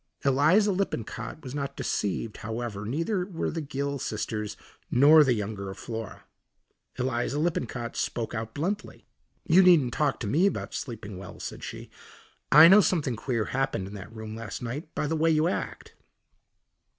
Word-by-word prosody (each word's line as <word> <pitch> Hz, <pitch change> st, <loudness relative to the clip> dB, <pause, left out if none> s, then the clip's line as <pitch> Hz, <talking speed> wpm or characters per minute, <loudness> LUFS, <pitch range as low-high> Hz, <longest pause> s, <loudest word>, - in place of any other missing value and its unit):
Eliza 155 Hz, +10 st, +4 dB
Lippincott 180 Hz, -, -3 dB
was 130 Hz, -2 st, -7 dB
not 140 Hz, -1 st, -4 dB
deceived, 105 Hz, +2 st, -2 dB
however, 110 Hz, -2 st, -5 dB
neither 165 Hz, -, -1 dB
were 180 Hz, -3 st, -3 dB
the 165 Hz, -, -3 dB
Gill 140 Hz, -1 st, -3 dB
sisters, 105 Hz, -2 st, -3 dB, 0.3 s
nor 150 Hz, +4 st, +7 dB
the 130 Hz, -4 st, +2 dB
young 105 Hz, 0 st, -3 dB
girl, 100 Hz, -1 st, -6 dB
Flora. 115 Hz, +1 st, -7 dB, 0.7 s
Eliza 125 Hz, +2 st, -1 dB
Lippincott 125 Hz, -7 st, -2 dB
spoke 115 Hz, -2 st, -2 dB
out 110 Hz, 0 st, -5 dB
bluntly. 195 Hz, +8 st, -3 dB, 0.4 s
"You 180 Hz, +2 st, +6 dB
needn't 165 Hz, -10 st, +5 dB
talk 145 Hz, +1 st, 0 dB
to -, -, -2 dB
me 160 Hz, -, +3 dB
about 200 Hz, -, -3 dB
sleeping 105 Hz, -6 st, -6 dB
well," 95 Hz, 0 st, -10 dB
said -, -, -7 dB
she. -, -, -8 dB, 0.6 s
"I 155 Hz, +3 st, +10 dB
know 200 Hz, +4 st, +8 dB
something 150 Hz, -10 st, 0 dB
queer 115 Hz, -1 st, -1 dB
happened 130 Hz, -7 st, -1 dB
in 100 Hz, -, -9 dB
that 100 Hz, +1 st, -9 dB
room 110 Hz, -1 st, -7 dB
last 115 Hz, +2 st, -6 dB
night 140 Hz, +7 st, -6 dB
by -, -, -1 dB
the 160 Hz, +2 st, -1 dB
way 160 Hz, +1 st, +2 dB
you 155 Hz, 0 st, +3 dB
act." 180 Hz, -, -4 dB
130 Hz, 160 wpm, -27 LUFS, 110-160 Hz, 0.7 s, I